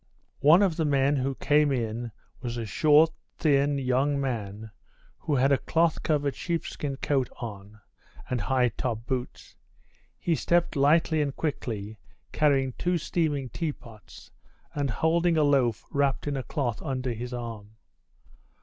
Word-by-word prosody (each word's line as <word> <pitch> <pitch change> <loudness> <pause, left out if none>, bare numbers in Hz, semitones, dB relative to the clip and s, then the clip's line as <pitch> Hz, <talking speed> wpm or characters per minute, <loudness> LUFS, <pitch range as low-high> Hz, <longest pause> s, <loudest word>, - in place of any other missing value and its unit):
One 160 +7 +6
of 180 -5 +1
the 165 - +1
men 140 -1 +2
who 135 +1 -1
came 150 +1 +3
in 115 -2 -2 0.3
was 120 -2 -4
a 115 - -3
short, 155 +8 +4 0.3
thin, 145 -2 +2
young 135 +2 +1
man, 110 -5 -4 0.5
who 150 - -1
had 135 +1 +3
a 140 - +4
cloth 165 -1 +1
covered 145 -3 0
sheepskin 160 -4 -3
coat 135 -2 0
on, 105 -2 -8 0.5
and 125 -3 -2
high 125 +1 +2
top 115 -1 -4
boots. 125 -1 -5 0.6
He 170 - 0
stepped 170 +2 +1
lightly 155 +3 +3
and 140 -2 -2
quickly, 110 -8 -4 0.3
carrying 135 -4 +2
two 180 0 +1
steaming 150 -5 -1
teapots, 115 - -7 0.4
and 140 -2 -1
holding 165 +7 +2
a 155 - +4
loaf 130 -6 +2
wrapped 140 -1 0
in 145 -1 -2
a 135 - -2
cloth 125 -4 -3
under 130 -2 -2
his 120 +2 -6
arm. 115 -3 -7
135 Hz, 145 wpm, -27 LUFS, 120-150 Hz, 0.6 s, One